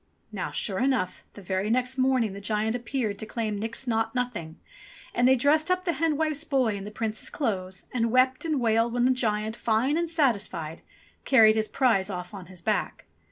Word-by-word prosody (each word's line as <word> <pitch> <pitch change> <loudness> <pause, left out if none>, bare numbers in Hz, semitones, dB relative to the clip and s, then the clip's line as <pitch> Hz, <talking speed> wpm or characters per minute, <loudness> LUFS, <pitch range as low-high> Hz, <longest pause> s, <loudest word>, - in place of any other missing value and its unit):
Now - - -3
sure 190 -3 -2
enough 255 -9 0
the 205 - -11
very 190 +3 -1
next 250 +2 +1
morning 255 -5 +2
the 200 - -8
giant 215 +2 -1
appeared 240 -4 -2
to 220 - -6
claim 220 -3 -3
Nix 225 +5 -4
Naught 225 -1 0
Nothing, 210 -11 -3 0.5
and 245 +1 +3
they 260 - +6
dressed 295 +6 +2
up 365 0 +1
the 340 - +1
hen 310 0 0
wife's 310 -1 -1
boy 260 -8 +1
in 195 0 -6
the - - -5
Prince's 215 0 -4
clothes 190 -8 -3
and 230 -2 0
wept 255 +2 +3
and 310 -4 0
wailed 230 0 +2
when 245 0 +2
the 260 - +4
giant, 220 -3 0
fine 240 +8 +1
and 340 -1 -1
satisfied, 200 - 0 0.4
carried 220 -5 +6
his 220 -1 0
prize 220 -8 +2
off 180 -1 -6
on 190 -3 -9
his 185 -1 -12
back. - - -2
230 Hz, 200 wpm, -27 LUFS, 210-260 Hz, 0.5 s, they